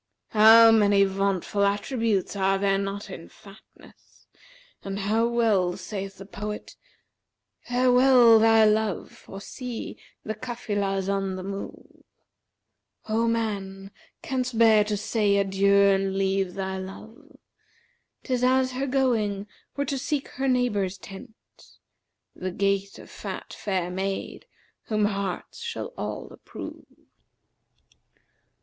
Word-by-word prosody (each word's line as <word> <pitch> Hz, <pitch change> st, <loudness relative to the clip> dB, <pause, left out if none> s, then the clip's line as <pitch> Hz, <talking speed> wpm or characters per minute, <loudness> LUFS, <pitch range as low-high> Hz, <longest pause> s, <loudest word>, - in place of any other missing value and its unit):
How 225 Hz, +1 st, +8 dB
many 205 Hz, -2 st, +4 dB
vauntful 195 Hz, 0 st, -1 dB
attributes 205 Hz, 0 st, 0 dB
are 195 Hz, 0 st, +1 dB
there 195 Hz, 0 st, +1 dB
not 200 Hz, 0 st, -5 dB
in 170 Hz, -3 st, -9 dB
fatness, 200 Hz, +1 st, -19 dB, 0.6 s
and 195 Hz, 0 st, -4 dB
how 215 Hz, +3 st, +1 dB
well 215 Hz, -7 st, +1 dB
saith 195 Hz, +1 st, -6 dB
the 195 Hz, -, -10 dB
poet, 210 Hz, +1 st, -7 dB, 0.9 s
'Farewell 250 Hz, -1 st, +5 dB
thy 225 Hz, 0 st, +5 dB
love, 215 Hz, -2 st, 0 dB
for 195 Hz, -, -11 dB
see, 245 Hz, +3 st, -7 dB, 0.2 s
the 215 Hz, -, -3 dB
Cafilah's[FN#371] 205 Hz, -5 st, -3 dB
on 195 Hz, -1 st, -2 dB
the 185 Hz, -, -6 dB
move: 195 Hz, +1 st, -8 dB, 0.5 s
* -, -, -29 dB
O 225 Hz, +2 st, +1 dB
man, 200 Hz, -4 st, -3 dB, 0.3 s
canst 255 Hz, -3 st, -2 dB
bear 220 Hz, -2 st, +6 dB
to 210 Hz, 0 st, -2 dB
say 210 Hz, -1 st, +1 dB
adieu 195 Hz, 0 st, +2 dB
and 195 Hz, -1 st, +3 dB
leave 195 Hz, -1 st, 0 dB
thy 190 Hz, -1 st, -3 dB
love? 220 Hz, +10 st, -11 dB, 0.9 s
'Tis 250 Hz, -2 st, -1 dB
as 260 Hz, 0 st, +3 dB
her 265 Hz, +2 st, -3 dB
going 225 Hz, -7 st, 0 dB, 0.3 s
were 280 Hz, -, -1 dB
to 275 Hz, 0 st, -2 dB
seek 285 Hz, 0 st, -2 dB
her 270 Hz, +1 st, -3 dB
neighbour's 210 Hz, -7 st, 0 dB
tent, 205 Hz, +5 st, -11 dB, 0.5 s
* -, -, -55 dB
The 185 Hz, -, -4 dB
gait 195 Hz, +1 st, -1 dB
of -, -, -13 dB
fat -, -, -7 dB
fair 185 Hz, -3 st, -2 dB
maid, 195 Hz, +1 st, -4 dB, 0.4 s
whom 215 Hz, -1 st, +1 dB
hearts 200 Hz, -, -4 dB
shall 470 Hz, +1 st, -5 dB
all -, -, -5 dB
approve.' -, -, -10 dB
205 Hz, 125 wpm, -25 LUFS, 195-230 Hz, 0.9 s, How